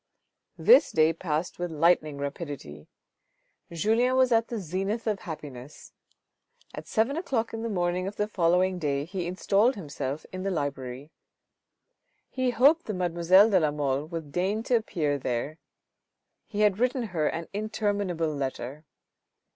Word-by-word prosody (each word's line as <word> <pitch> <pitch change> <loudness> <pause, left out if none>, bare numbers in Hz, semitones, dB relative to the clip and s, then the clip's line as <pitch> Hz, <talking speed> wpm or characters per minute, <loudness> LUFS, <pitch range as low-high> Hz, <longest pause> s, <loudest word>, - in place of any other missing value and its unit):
This - - +6
day 160 0 +4
passed 165 0 -3
with 175 0 -2
lightning 155 -2 +2
rapidity. 140 - -6 0.8
Julien 225 +9 +2
was 260 -1 +4
at 230 0 +3
the 235 - -4
zenith 195 +5 -3
of 210 -3 0
happiness. 145 -4 -9 0.8
At - - -8
seven 230 +5 +1
o'clock 245 -10 -2
in 225 - -4
the 230 - -3
morning 180 -1 -1
of 200 - -5
the 210 - -1
following 180 -1 +2
day 140 -3 -1
he 180 0 -4
installed 200 +7 +2
himself 145 -4 -5
in 185 - -5
the 195 - -1
library. 140 -3 -4 1.2
He 255 -1 0
hoped 280 +8 +4
the 215 - -2
mademoiselle 180 +4 +4
de 190 - +5
la 155 -3 +2
Mole 145 -1 -1
would 160 -3 -7
deign 195 +7 -1
to 245 - +1
appear 155 -10 0
there; 130 +5 -3 0.9
he 210 -1 -3
had 210 -1 +3
written 250 +1 +1
her 155 -3 +1
an 165 0 -3
interminable 205 -6 -1
letter. 140 +1 -5
175 Hz, 145 wpm, -27 LUFS, 150-215 Hz, 1.2 s, This